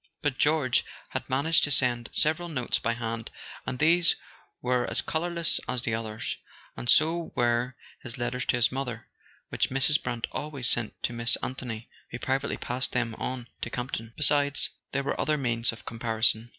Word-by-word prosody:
But 145 -3 0
George 150 -5 +3 0.3
had - - -4
managed 145 +5 +3
to - - -3
send 125 -4 +3
several 160 +3 +1
notes 125 -7 0
by 115 - 0
hand, 115 -1 -4 0.4
and 125 - -2
these 165 +4 +5 0.4
were 125 0 0
as - - +2
colourless 170 0 +1
as 125 -1 -2
the 115 - -1
others; 110 0 -3 0.4
and 120 - -6
so 165 +4 +3
were 120 +1 +1 0.3
his 115 - -6
letters 125 +1 -2
to - - +2
his 120 -1 +4
mother, 125 -4 -4 0.4
which - - 0
Mrs. 135 +3 +4
Brant 120 -2 -2
always 140 -5 0
sent 120 -3 +2
to - - 0
Miss 115 0 +3
Anthony, 120 -3 -5 0.2
who 120 - -5
privately 135 +3 -1
passed 125 +1 -2
them 120 -2 0
on 125 -2 -4
to - - -2
Campton. 120 -2 -5
Besides, 145 -1 +4 0.2
there 140 0 -1
were - - -1
other 155 0 +1
means 120 -3 +1
of 115 - -12
comparison. 115 0 0
125 Hz, 175 wpm, -28 LUFS, 120-145 Hz, 0.4 s, these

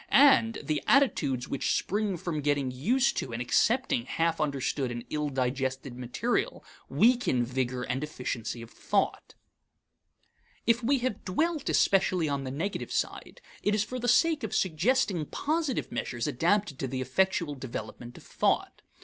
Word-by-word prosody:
And 265 -5 +5
the 155 -2 -1
attitudes 145 - +2
which 140 - 0
spring 205 -1 -1
from 165 -3 -3
getting 145 -2 0
used 240 - +1
to 130 - -3
and 115 - -4
accepting 240 - +2
half 165 0 0
understood 140 -2 -1
and 120 -1 -6
ill 150 -1 -1
digested 130 0 -2
material 125 - -2 0.2
weaken 235 - +3
vigor 125 0 -2
and 130 +3 -2
efficiency 125 -5 -4
of 115 - -13
thought. - - -1 1.3
If 235 +1 +3
we 275 +4 +3
have 240 -6 -2
dwelt 310 - -1
especially 185 -4 +3
on 140 -2 -2
the - - -3
negative 170 +9 -3
side, - - -3 0.2
it 210 - +1
is 210 - +2
for 255 +3 -5
the 245 - -2
sake 305 +5 +4
of 220 - -3
suggesting 190 - +1
positive 310 -3 -1
measures 120 -2 -3
adapted 165 +3 +1
to 135 - -2
the 130 +1 -4
effectual 170 +3 +1
development 120 -2 -7
of - - -13
thought. - - 0
155 Hz, 150 wpm, -29 LUFS, -, 1.3 s, And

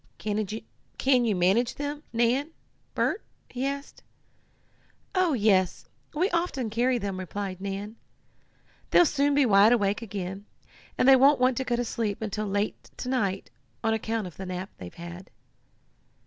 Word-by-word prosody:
Can 210 -1 -2 0.8
you 215 -3 +1
manage 195 +7 +2
them, 290 +1 -4
Nan 240 +5 +1 0.5
Bert?" 410 - 0 0.3
he 255 +2 -2
asked. 280 0 -6 1.1
"Oh, 370 -4 +2
yes, 200 -6 +2 0.3
we 350 +5 +2
often 335 -10 -1
carry 245 +3 +2
them," 200 -4 -3
replied 190 0 -5
Nan. 200 +3 -5 0.9
"They'll 350 - +6
soon 285 -1 +2
be 285 -1 +5
wide 210 +1 +6
awake 205 -2 +1
again, 195 -2 -6 0.5
and - - +3
they 270 - +9
won't 275 +2 +5
want 255 0 +3
to 265 - 0
go 245 -2 0
to 240 0 -1
sleep 220 -3 -2
until 215 -1 -3
late 200 +1 -2
to 250 - -4
night, 200 - -1 0.3
on 225 - +2
account 220 -1 -2
of 180 - -9
the 190 - -6
nap 185 +2 -5
they've 90 -1 -8
had." 175 +2 -9
220 Hz, 150 wpm, -27 LUFS, 195-260 Hz, 1.1 s, they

